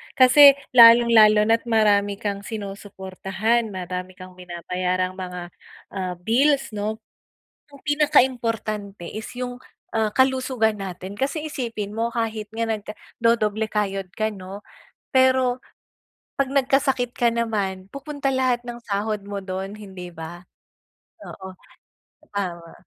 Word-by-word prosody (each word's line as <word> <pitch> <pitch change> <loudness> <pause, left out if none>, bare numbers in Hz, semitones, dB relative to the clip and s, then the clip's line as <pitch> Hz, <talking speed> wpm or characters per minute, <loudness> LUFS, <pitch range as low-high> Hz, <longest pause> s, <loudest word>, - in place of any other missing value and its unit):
Kasi 275 +2 +8 0.2
lalong-lalo 230 -3 +8
na 225 0 +5
at 230 - -25
marami 205 -3 +3
kang 200 -1 -3
sinusuportahan, 200 +1 -3
marami 185 0 -5
kang 185 0 -13
binabayarang 180 +1 -2
mga, 180 -1 -6 0.5
ah, 185 -2 -3
bills 270 +9 +2
ano. 210 +1 -3 0.7
Iyung 280 -1 -16
pinakaimportante 230 - 0
is 215 0 -6
iyung, 250 0 -4 0.4
ah, 220 -1 +1
kalusugan 260 -4 +2
natin. 190 0 -7
Kasi, 285 +4 -2
isipin 230 -8 -4
mo 230 +1 0
kahit 225 -2 -2
nga 230 +1 -1
nag-dodoble 220 0 -1
kayod 195 -2 -1
ka 215 0 0
ano, 195 0 -9 0.5
pero, 260 -1 +3 0.8
kapag 275 -1 -1
nagkasakit 270 -2 +1
ka 240 -1 +2
naman 205 -5 -2
pupunta 280 0 -5
lahat 250 -2 0
ng 240 0 -7
sahod 210 -1 -2
mo 200 0 -6
doon 190 0 -5
hindi 190 -4 -9
ba? 170 +1 -9 0.8
Oo 190 0 -9 0.8
tama. 175 -4 -4
215 Hz, 120 wpm, -23 LUFS, 195-245 Hz, 0.8 s, Kasi